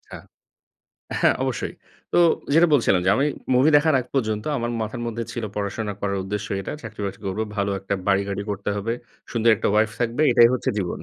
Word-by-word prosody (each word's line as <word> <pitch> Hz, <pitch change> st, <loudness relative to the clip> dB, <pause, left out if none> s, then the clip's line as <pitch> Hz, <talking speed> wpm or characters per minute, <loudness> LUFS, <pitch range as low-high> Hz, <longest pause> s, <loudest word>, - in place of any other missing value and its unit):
আচ্ছা -, -, -7 dB, 1.0 s
হ্যাঁ, -, -, +4 dB
অবশ্যই। -, -, -2 dB, 0.4 s
তো -, -, +1 dB, 0.4 s
যেটা 165 Hz, +2 st, +6 dB
বলছিলাম 105 Hz, -8 st, +3 dB
যে -, -, +5 dB
আমি 140 Hz, -, +2 dB, 0.3 s
মুভি 135 Hz, +5 st, +5 dB
দেখার 155 Hz, +1 st, +3 dB
আগ 125 Hz, -, -9 dB
পর্যন্ত 110 Hz, -5 st, 0 dB
আমার 120 Hz, 0 st, -2 dB
মাথার 110 Hz, +1 st, -4 dB
মধ্যে 115 Hz, 0 st, -3 dB
ছিল 120 Hz, -, -4 dB
"পড়াশোনা 105 Hz, +1 st, -2 dB
করার 100 Hz, -1 st, -1 dB
উদ্দেশ্য 100 Hz, +1 st, -4 dB
এটা -, -, -5 dB
চাকরি-বাকরি 105 Hz, -3 st, -6 dB
করব। 95 Hz, +3 st, -2 dB, 0.2 s
ভালো 100 Hz, 0 st, 0 dB
একটা 95 Hz, +1 st, -2 dB
বাড়ি-গাড়ি 100 Hz, 0 st, +1 dB
করতে 100 Hz, 0 st, -4 dB
হবে। 110 Hz, +3 st, -2 dB, 0.4 s
সুন্দর 115 Hz, -1 st, +3 dB
একটা -, -, -1 dB
ওয়াইফ 110 Hz, +1 st, +3 dB
থাকবে। 120 Hz, +4 st, 0 dB
এটাই 120 Hz, 0 st, +7 dB
হচ্ছে -, -, -2 dB
জীবন।" 90 Hz, -3 st, -3 dB
110 Hz, 185 wpm, -23 LUFS, 100-120 Hz, 1.0 s, এটাই